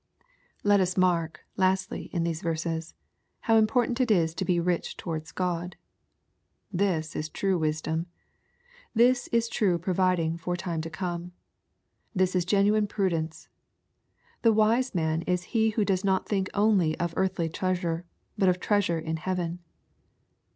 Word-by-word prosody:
Let 205 -1 +5
us 185 0 0
mark, 170 -4 +1 0.2
lastly, 190 0 0
in 170 -2 -1
these 165 -2 -2
verses, 165 0 -3 0.5
how 225 - +3
important 235 +3 +2
it 250 - +1
is 165 -6 +3
to 190 - -3
be 180 -2 +1
rich 175 0 -1
towards 160 -3 -5
God. 180 0 -2 1.0
This 175 -4 0
is 155 - -3
true 190 +2 0
wisdom. 160 +2 -1 0.9
This 245 +2 +4
is 230 0 +1
true 190 -6 +1
providing 175 -2 +1
for 175 +1 -3
time 170 -3 -3
to 165 - -5
come. 175 +1 -4 0.8
This 185 0 +2
is 180 -2 +2
genuine 205 +2 +3
prudence. 165 -6 -2 0.9
The 230 - +5
wise 225 +3 +2
man 160 -1 +1
is 180 -1 +1
he 220 -1 +3
who 215 -1 0
does 190 -1 0
not 190 -1 +1
think 195 -2 0
only 200 -6 +3
of 170 -1 -1
earthly 190 -3 0
treasure, 175 0 -1 0.4
but 190 -2 +5
of 180 0 +1
treasure 200 -4 +1
in 160 0 -3
heaven. 175 0 -2
180 Hz, 145 wpm, -27 LUFS, 165-200 Hz, 1.0 s, Let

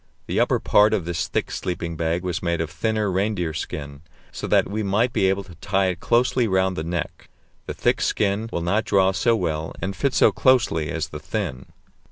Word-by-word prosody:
The - - -1
upper - - +2
part 105 +1 +4
of 85 - -3
this 85 -1 -2
thick - - -2
sleeping 85 -2 -3
bag 85 +2 -1
was 90 -1 -2
made 85 -1 -1
of 80 -2 -3
thinner 110 0 -1
reindeer 95 -4 -1
skin, 70 -2 -6 0.3
so - - -5
that - - +3
we 105 +2 -3
might 105 +5 +1
be 95 - +3
able 95 +1 0
to 95 -2 -14
tie 95 +3 0
it 90 -2 -4
closely 120 +1 +2
round 95 -1 +1
the 80 - -3
neck; 85 0 -5 0.4
the - - -4
thick - - +1
skin 105 +2 0
will 85 - -2
not 100 +6 +1
draw 95 -1 +3
so 115 +5 +2
well 80 -6 -2
and 95 +3 -3
fit 130 +7 0
so - - +5
closely 95 - +2
as 80 0 -3
the 75 - -7
thin. 80 - -4
95 Hz, 210 wpm, -23 LUFS, 80-105 Hz, 0.4 s, so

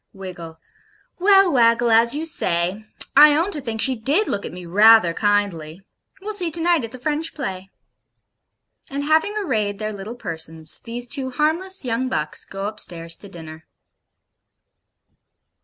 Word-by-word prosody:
WIGGLE. 175 -4 -9 0.6
'Well, 390 -1 +5
Waggle, 235 -1 +3
as 230 +3 +4
you 310 +2 -3
say 195 - 0 0.3
I 295 +1 +8
own 335 +6 +1
I - - -3
think 230 -4 -4
she 265 +1 +2
DID 280 - +1
look 200 - -3
at - - -9
me 180 0 -10
rather 205 0 +5
kindly. 195 -5 -1 0.4
We'll 425 +2 -5
see 360 -5 +1
to 330 - -2
night 340 -4 +2
at 230 - -6
the 255 - -9
French 300 +5 -3
play.' 190 -9 -6 1.2
And 280 +1 -4
having 320 +8 +1
arrayed 215 - -2
their 215 0 -4
little 205 +4 -8
persons, 160 -6 -1
these 240 +1 -7
two 260 +1 -2
harmless 320 +6 -1
young 250 +2 -2
bucks 150 -10 -3
go 195 0 -7
upstairs 170 -6 -5
to 200 - -13
dinner. 160 -3 -12
230 Hz, 155 wpm, -21 LUFS, 190-300 Hz, 1.2 s, I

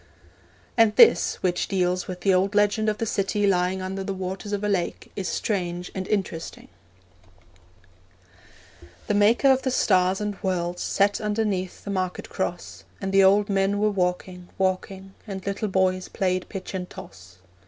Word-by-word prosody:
And 225 -2 +4
this, 460 - +6
which 180 -1 0
deals 180 -2 0
with 180 -1 -6
the 195 0 +3
old 195 +2 +1
legend 210 +1 +2
of 210 - -2
the 225 - -2
city 205 0 0
lying 185 -1 +1
under 190 +1 -4
the 195 0 -4
waters 190 +2 -5
of 205 0 -2
a - - +1
lake, 190 -4 -2
is 190 -2 -3
strange 180 -4 -2
and 190 -1 -4
interesting: 190 -5 -3 2.4
The - - -1
maker 215 +7 +4
of 265 0 +2
the 260 - -1
stars 185 -6 +2
and 210 -2 -4
worlds 180 -2 -2
Sat 200 0 +1
underneath 210 -3 -2
the 200 - -5
market 185 -2 -3
cross, 180 -2 -4 0.2
And 195 -1 -3
the 195 0 +5
old 200 +2 +5
men 195 0 +1
were 210 +1 +2
walking, 180 -1 -2
walking, 190 0 -2
And 190 -2 -6
little 200 +2 -2
boys 185 -1 +1
played 185 -1 -1
pitch 195 -2 -7
and 180 -1 -4
toss. 90 0 -12
190 Hz, 165 wpm, -25 LUFS, 185-205 Hz, 2.4 s, this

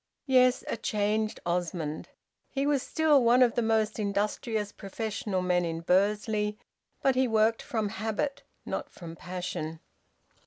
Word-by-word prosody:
Yes, 255 -2 +4
a - - -2
changed 215 0 0
Osmond! 170 -3 -2 0.4
He 275 0 -1
was 285 -2 +2
still 305 -3 +3
one 245 +2 +6
of 240 -2 +3
the 240 - +1
most 220 -1 +1
industrious 210 +1 -1
professional 205 -2 -3
men 180 -1 +2
in 165 -1 -3
Bursley; 210 +4 +1 0.5
but 270 - +4
he 260 0 +2
worked 225 0 +2
from 220 -3 -2
habit, 220 +6 -2 0.2
not - - -4
from 165 -2 -10
passion. 165 -3 -5
215 Hz, 140 wpm, -29 LUFS, 185-235 Hz, 0.5 s, one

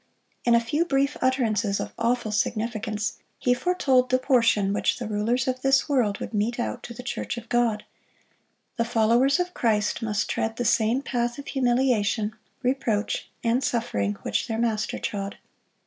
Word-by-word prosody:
In 235 -1 +5
a - - +6
few 265 +8 0
brief 280 -3 +1
utterances 225 -6 +1
of - - -5
awful 230 -1 0
significance, 215 0 -2 0.2
He 245 - +2
foretold 260 -4 +2
the 255 - +4
portion 230 -7 +3
which 210 - +1
the 240 - -5
rulers 225 +5 0
of 255 0 -1
this 270 +1 +3
world 245 -8 +1
would - - -6
mete 220 +3 0
out 110 -1 -2
to 235 - -8
the 250 - -8
church 245 - -4
of 235 -1 -8
God.(57) 235 -3 +1 0.9
The 230 - +1
followers 235 +6 +3
of 360 0 -1
Christ 215 -1 +1
must 210 -2 -1
tread 225 0 -1
the 245 - -2
same 240 +2 +2
path 240 -2 -1
of 285 - -8
humiliation, 240 -5 +1 0.3
reproach, 245 -5 -1
and 240 +3 +2
suffering 105 - 0
which 105 - -1
their 225 - -2
Master 225 -2 0
trod. 200 -2 -4
235 Hz, 165 wpm, -25 LUFS, 215-255 Hz, 0.9 s, a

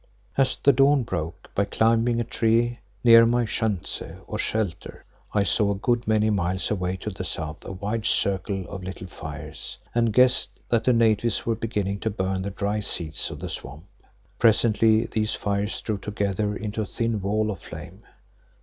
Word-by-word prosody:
As 135 -1 +2
the 140 - +6
dawn 135 +1 +4
broke, 85 -3 -5
by 100 - +1
climbing 115 +2 +2
a - - +1
tree 115 +2 +1 0.2
near 115 -1 +9
my 120 +1 +2
schanze 110 -4 -1 0.2
or - - -5
shelter, 105 -6 -2 0.3
I 105 - +2
saw 100 +1 +2
a - - -5
good 120 +2 0
many 110 0 +3
miles 95 -1 0
away 90 -2 -1
to 105 - -4
the 95 - -6
south 80 -3 -4
a - - -6
wide 105 +3 -2
circle 95 -1 0
of 100 -2 -7
little 95 0 -6
fires, 80 -3 -7 0.2
and 115 -1 +2
guessed 125 +3 +3
that 115 -2 +2
the 125 - +5
natives 115 -1 +2
were 115 - +1
beginning 105 -3 -2
to 110 - -1
burn 95 -2 -2
the 100 - -3
dry 100 +2 -2 0.2
reeds 80 -2 -3
of 75 -3 -8
the 90 - -4
swamp. 80 -1 -7 0.6
Presently 110 -1 +4
these 110 0 -1
fires 100 0 -1
drew 105 -3 -2
together 105 0 -2
into 105 +2 -3
a 105 - -3
thin 115 -2 -1
wall 105 +2 0
of 95 - -6
flame. - - -10
105 Hz, 175 wpm, -25 LUFS, 95-115 Hz, 0.6 s, near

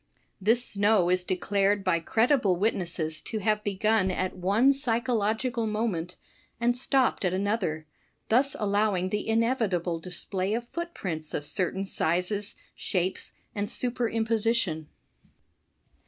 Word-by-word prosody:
'* - - -43
This 230 +5 +4
snow 200 -3 +2
is 185 0 +2
declared 195 +2 +1
by 185 -3 +2
credible 225 - +2
witnesses 170 -6 -1
to 220 - -5
have 210 0 0
begun 205 0 +1
at 185 0 -2
one 205 +9 +3
psychological 235 -2 0
moment, 205 -6 -2 0.4
and 240 +1 +2
stopped 260 -2 +1
at 185 -1 +1
another; 190 -6 -1 0.4
thus 265 +5 +3
allowing 205 -3 +1
the 210 +2 -2
inevitable 220 -8 +1
display 185 +3 -2
of 235 +1 -4
footprints 185 - -5
of 145 - -3
certain 190 +3 -1
sizes, 190 +4 -1 0.2
shapes 185 -1 -2 0.2
and 205 0 -2
superimposition. 225 -8 0
205 Hz, 120 wpm, -27 LUFS, 185-230 Hz, 0.4 s, This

